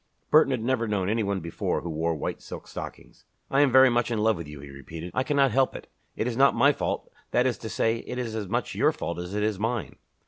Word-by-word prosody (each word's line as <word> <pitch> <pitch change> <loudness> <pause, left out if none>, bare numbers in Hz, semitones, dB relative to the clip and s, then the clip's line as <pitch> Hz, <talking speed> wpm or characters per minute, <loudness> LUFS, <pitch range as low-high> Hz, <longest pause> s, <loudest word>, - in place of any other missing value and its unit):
Burton 155 -2 +6
had 130 -4 -1
never 120 -2 0
known 100 -3 0
any 110 +2 +1
one 100 -2 -1
before 85 0 -2
who 85 - -5
wore 80 +1 -1
white 75 - -4
silk - - -9
stockings. - - -9 0.3
"I 135 - +4
am 145 -3 +4
very 130 +1 +8
much 120 0 +1
in 115 - -1
love 110 +1 +3
with 85 -3 -7
you," 75 -1 -9
he 70 0 -10
repeated. 80 +5 -8
"I - - +1
cannot 140 -1 +2
help 130 +3 +2
it. - - -8 0.3
It - - -1
is 120 -1 -2
not 135 +2 +5
my 140 - +5
fault - - -3 0.2
that 125 - +2
is 130 -2 0
to 110 - -6
say, 115 +1 +1
it 125 - -7
is 120 -3 -3
as 105 -3 -3
much - - -2
your - - +3
fault 85 - -4
as 90 +3 -5
it 105 - 0
is 105 -3 0
mine." 115 +1 -2
110 Hz, 265 wpm, -26 LUFS, 90-125 Hz, 0.3 s, very